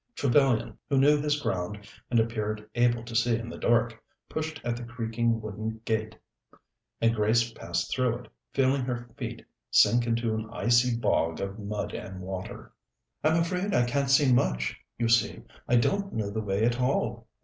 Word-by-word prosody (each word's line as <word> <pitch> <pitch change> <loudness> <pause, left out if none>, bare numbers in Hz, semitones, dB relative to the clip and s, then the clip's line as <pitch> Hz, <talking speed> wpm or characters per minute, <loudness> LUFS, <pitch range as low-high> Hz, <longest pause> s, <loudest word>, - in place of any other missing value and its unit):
Trevellyan, 130 -4 +2
who 140 - +2
knew 145 +2 +5
his 150 0 +1
ground 100 -2 -3 0.2
and 120 - +3
appeared 110 -1 -2
able 120 -1 +2
to 120 -1 -8
see 115 0 +3
in 115 0 -6
the - - -7
dark, 115 -1 +1 0.2
pushed 155 -1 -4
at 120 -1 -1
the 120 - -7
creaking 115 -1 -1
wooden 110 +1 -5
gate, 110 -1 -1 0.8
and 115 0 +3
Grace 115 +2 +2
passed 85 -3 -3
through 125 -2 +1
it, - - -13 0.2
feeling 135 0 +2
her 120 -1 -3
feet - - -6 0.2
sink 120 0 +4
into 115 -1 0
an 110 0 -3
icy 120 0 +3
bog 85 -7 +1
of 100 +2 -4
mud 105 0 -4
and 95 -1 -6
water. 95 0 -7 0.5
"I'm 160 +2 +3
afraid 180 +4 0
I 120 - +4
can't 140 +3 0
see 135 -1 +5
much. 60 - +1 0.2
You 120 - 0
see, 115 -2 +2 0.2
I 120 - +3
don't 200 +11 +1
know 105 -2 -2
the 110 +1 -2
way 100 +1 0
at 120 +1 +1
all." 125 +2 0
115 Hz, 175 wpm, -28 LUFS, 110-125 Hz, 0.8 s, knew